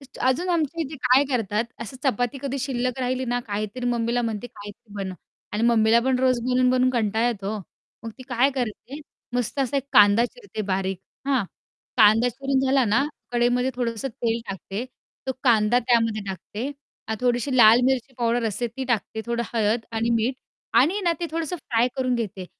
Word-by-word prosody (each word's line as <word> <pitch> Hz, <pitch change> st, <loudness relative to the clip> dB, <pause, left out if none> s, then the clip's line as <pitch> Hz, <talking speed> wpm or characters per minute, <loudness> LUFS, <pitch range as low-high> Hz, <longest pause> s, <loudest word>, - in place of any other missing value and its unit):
तेच 275 Hz, -2 st, -15 dB
अजून 335 Hz, +8 st, +1 dB
आमच्या 335 Hz, -2 st, 0 dB
इथे 305 Hz, 0 st, -6 dB
काय 260 Hz, +3 st, +5 dB
करतात, 225 Hz, -3 st, 0 dB, 0.2 s
असं 235 Hz, +3 st, -7 dB
चपाती 245 Hz, 0 st, 0 dB
कधी 275 Hz, 0 st, -2 dB
शिल्लक 255 Hz, -2 st, -2 dB
राहिली 255 Hz, +1 st, -1 dB
ना, 245 Hz, 0 st, -1 dB
काहीतरी 215 Hz, +4 st, -3 dB
मम्मीला 240 Hz, 0 st, 0 dB
म्हणते, 225 Hz, 0 st, -3 dB
"काहीतरी 205 Hz, -1 st, -12 dB
बनव" 195 Hz, -2 st, -4 dB, 0.4 s
आणि 210 Hz, +2 st, -1 dB
मम्मीला 230 Hz, -1 st, +4 dB
पण 260 Hz, -1 st, +2 dB
रोज 255 Hz, -1 st, +2 dB
बनवून-बनवून 255 Hz, +1 st, +3 dB
कंटाळा 225 Hz, -1 st, +1 dB
येतो 205 Hz, -3 st, -3 dB
ओ, -, -, -6 dB, 0.4 s
मग 230 Hz, -, -5 dB
ती -, -, -8 dB
काय 250 Hz, +2 st, +3 dB
करते, 255 Hz, +3 st, -4 dB, 0.3 s
मस्त 245 Hz, +2 st, -2 dB
असा 270 Hz, +1 st, 0 dB
एक 270 Hz, -, -1 dB
कांदा 205 Hz, +3 st, +6 dB
चिरते 405 Hz, -, -6 dB
बारीक, 190 Hz, 0 st, -1 dB, 0.3 s
हां? 265 Hz, -6 st, +2 dB, 0.5 s
कांदा 225 Hz, +1 st, +6 dB
चिरून 270 Hz, +2 st, -1 dB
झाला 265 Hz, 0 st, +3 dB
ना, 230 Hz, +5 st, +2 dB, 0.3 s
कढईमध्ये 245 Hz, +1 st, +2 dB
थोडंसं 235 Hz, 0 st, -2 dB
तेल 230 Hz, -1 st, -2 dB
टाकते, 195 Hz, +3 st, -5 dB, 0.4 s
तो 265 Hz, -, 0 dB
कांदा 230 Hz, -1 st, +4 dB
त्यामध्ये 230 Hz, -3 st, +1 dB
टाकते 205 Hz, +5 st, -5 dB, 0.4 s
आणि 220 Hz, -, -1 dB
थोडीशी 250 Hz, +2 st, +1 dB
लाल 230 Hz, 0 st, +8 dB
मिरची 265 Hz, 0 st, 0 dB
पावडर 235 Hz, 0 st, +1 dB
असते 230 Hz, +4 st, -2 dB
ती 265 Hz, -, -3 dB
टाकते, 220 Hz, -2 st, -1 dB
थोडं 235 Hz, 0 st, -1 dB
हळद 220 Hz, +1 st, +2 dB
आणि 225 Hz, +1 st, 0 dB
मीठ 230 Hz, +3 st, +1 dB, 0.4 s
आणि 290 Hz, +8 st, +5 dB
आहे 415 Hz, -, -1 dB
ना 345 Hz, -2 st, +3 dB
ते 340 Hz, -, -1 dB
थोडंसं 330 Hz, +2 st, -2 dB
फ्राय 245 Hz, -6 st, +1 dB
करून 255 Hz, -1 st, +1 dB
घेते 205 Hz, -5 st, -4 dB
240 Hz, 180 wpm, -24 LUFS, 220-260 Hz, 0.5 s, लाल